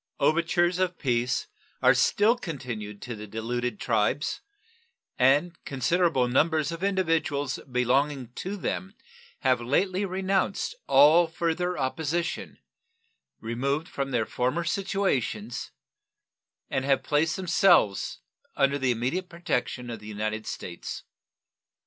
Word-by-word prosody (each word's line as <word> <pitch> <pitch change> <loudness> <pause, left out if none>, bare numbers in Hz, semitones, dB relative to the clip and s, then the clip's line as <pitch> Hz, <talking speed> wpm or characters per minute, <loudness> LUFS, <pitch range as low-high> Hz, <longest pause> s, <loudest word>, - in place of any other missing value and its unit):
Overtures 170 +4 +2
of 185 -1 0
peace 125 -2 0 0.3
are - - +6
still 215 +4 +3
continued 125 - -6
to 120 -2 -5
the 105 0 -8
deluded 115 +1 -3
tribes, 115 +6 0 0.8
and 145 +7 +3
considerable 140 -1 +1
numbers 155 +5 +2
of 165 +2 -6
individuals 165 -8 0
belonging 130 +1 +1
to 195 +8 -5
them 195 +1 -4 0.5
have 130 -4 +2
lately 185 +10 +1
renounced 190 - 0
all 165 +4 +6
further 170 +2 -1
opposition, 160 +5 -2 0.8
removed 140 +8 -1
from 140 -4 -3
their 120 -4 0
former 130 +7 -1
situations, 165 - -1 1.0
and 135 +1 +1
placed 155 +2 +1
themselves 180 - +3 0.3
under 140 +1 +2
the 130 -1 +1
immediate 130 +11 -1
protection 125 -7 -2
of 115 - -6
the 105 - -12
United 110 +1 -3
States. 85 -1 -6
140 Hz, 110 wpm, -27 LUFS, 125-175 Hz, 1.0 s, are